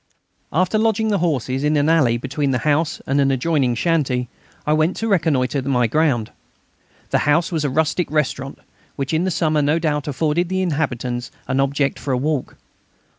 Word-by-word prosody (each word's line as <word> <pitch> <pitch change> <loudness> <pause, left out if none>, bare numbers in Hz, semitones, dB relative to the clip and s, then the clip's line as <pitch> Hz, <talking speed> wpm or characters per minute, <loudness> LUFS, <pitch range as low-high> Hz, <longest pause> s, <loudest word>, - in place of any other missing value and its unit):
After 185 +6 +1
lodging 220 0 +1
the 205 - +1
horses 135 -5 -1
in 150 0 +2
an 145 +1 +2
alley 145 -8 +3
between 140 +3 -2
the 130 - +1
house 155 +2 +1
and 140 +1 +1
an 135 - +3
adjoining 135 -2 +1
shanty 130 -5 0 0.4
I 150 - +2
went 155 +3 +2
to 225 - -2
reconnoitre 145 - +1
my 130 -2 +1
ground. 120 -3 +1 0.8
The - - +3
house 165 +4 +2
was 160 -3 -1
a 145 - 0
rustic 160 +4 0
restaurant, 140 -3 -2 0.4
which 135 +2 -3
in 160 +3 +1
the - - +1
summer 155 -3 +1
no 145 +3 +2
doubt 150 -3 -1
afforded 155 +5 0
the 190 0 0
inhabitants 125 -7 -2 0.2
an 130 - 0
object 140 +1 0
for 135 - -2
a - - +1
walk. 145 0 -2
150 Hz, 180 wpm, -20 LUFS, 135-165 Hz, 0.8 s, alley